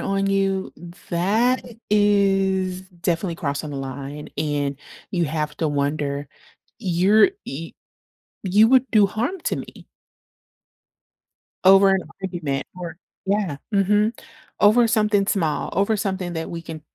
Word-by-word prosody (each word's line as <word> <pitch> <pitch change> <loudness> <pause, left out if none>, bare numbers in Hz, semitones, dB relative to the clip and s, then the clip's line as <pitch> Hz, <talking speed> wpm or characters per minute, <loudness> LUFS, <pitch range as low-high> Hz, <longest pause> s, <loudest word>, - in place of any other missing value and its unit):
on 195 0 0
you, 195 -1 0 0.4
that 215 +9 +1 0.2
is 195 -3 +2
definitely 175 -1 -3
crossing 145 -1 -3
the 140 - -5
line, 135 +2 -6
and 145 -2 -1 0.4
you 175 -2 +1
have 150 0 -3
to 160 - 0
wonder, 145 0 -1 0.5
you're 190 - +4 0.2
y 160 +5 -6 0.7
you 210 +4 +5
would 260 0 +4
do 210 -3 +6
harm 250 - -2
to - - 0
me - - -9 1.8
over 195 +1 +7
an 195 -1 +2 0.2
argument. 170 -7 -3
Or 175 -3 -7 0.3
Yeah. 195 -7 0 0.2
Mhm. 210 +3 +2 0.4
Over 230 +3 +5
something 210 -3 +2
small, 160 -8 0
over 200 +4 +2
something 190 -3 -2
that 160 -1 -4
we 170 - -5
can, 160 -2 -8
190 Hz, 125 wpm, -22 LUFS, 155-205 Hz, 1.8 s, over